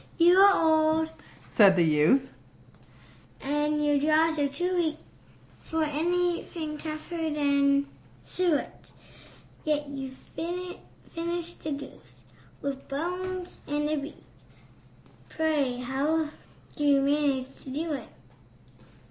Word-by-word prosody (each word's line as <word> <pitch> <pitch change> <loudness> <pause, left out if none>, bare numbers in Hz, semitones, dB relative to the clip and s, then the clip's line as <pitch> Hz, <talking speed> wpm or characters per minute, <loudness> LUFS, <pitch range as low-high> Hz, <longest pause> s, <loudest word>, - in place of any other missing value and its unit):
"You 345 +1 +6
are 395 0 +8
old," 315 0 +3 0.4
said 200 -3 +6
the 175 -2 +4
youth, 160 - +3 1.1
"and 295 +1 0
your 290 -1 +3
jaws 315 +2 +3
are 285 - +3
too 355 +7 -2
weak 320 -3 0 0.6
For 320 0 -1
anything 330 0 -1
tougher 320 +1 -4
than 280 -1 +2 0.4
suet; 350 -5 -1 0.8
Yet 295 -2 -1
you 270 -2 -6 0.2
finished 345 0 -6
the 305 - -2
goose, 280 0 -11 0.4
with 275 -1 -4
the 275 - -5
bones 360 +3 -4
and 295 +1 0
the 305 - 0
beak 285 +1 -7 1.1
Pray, 295 -6 0
how 285 +5 0 0.5
did 295 - -3
you 280 -1 +5
manage 275 -2 +1
to - - -9
do 310 +4 -2
it?" 280 - -6
300 Hz, 115 wpm, -28 LUFS, 280-330 Hz, 1.1 s, are